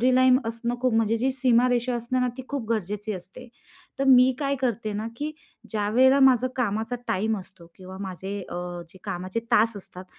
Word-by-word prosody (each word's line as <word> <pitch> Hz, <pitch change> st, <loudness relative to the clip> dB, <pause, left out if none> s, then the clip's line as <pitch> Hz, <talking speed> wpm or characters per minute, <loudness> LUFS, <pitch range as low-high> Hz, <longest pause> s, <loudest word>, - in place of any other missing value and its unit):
Boundary 255 Hz, +1 st, +4 dB
line 255 Hz, 0 st, +5 dB
असणं 230 Hz, +1 st, -2 dB
खूप, 255 Hz, -2 st, +1 dB
म्हणजे 225 Hz, 0 st, +2 dB
जी 255 Hz, +4 st, +1 dB
सीमारेषा 250 Hz, -1 st, +2 dB
असते 240 Hz, +2 st, -1 dB
ना, 250 Hz, -, +2 dB
ती 260 Hz, -, -6 dB
खूप 280 Hz, -5 st, -3 dB
गरजेची 210 Hz, 0 st, -2 dB
असते. 195 Hz, +7 st, -10 dB, 0.5 s
तर 275 Hz, -, +1 dB
मी 260 Hz, 0 st, +7 dB
काय 280 Hz, -1 st, 0 dB
करते 230 Hz, -4 st, -1 dB
ना, 215 Hz, +2 st, -3 dB
की 300 Hz, +4 st, -3 dB, 0.4 s
ज्यावेळेला 240 Hz, +6 st, +3 dB
माझं 255 Hz, -2 st, +5 dB
कामाचा 225 Hz, 0 st, -1 dB
टाईम 215 Hz, +3 st, 0 dB
असतो 185 Hz, -2 st, -13 dB
किंवा 185 Hz, 0 st, -10 dB
माझे 190 Hz, +1 st, -5 dB
अ, 175 Hz, -, -5 dB, 0.3 s
जे 190 Hz, -, -16 dB
कामाचे 185 Hz, +5 st, -3 dB
तास 225 Hz, -1 st, +4 dB
असतात, 185 Hz, -1 st, -9 dB
230 Hz, 185 wpm, -25 LUFS, 205-255 Hz, 0.5 s, मी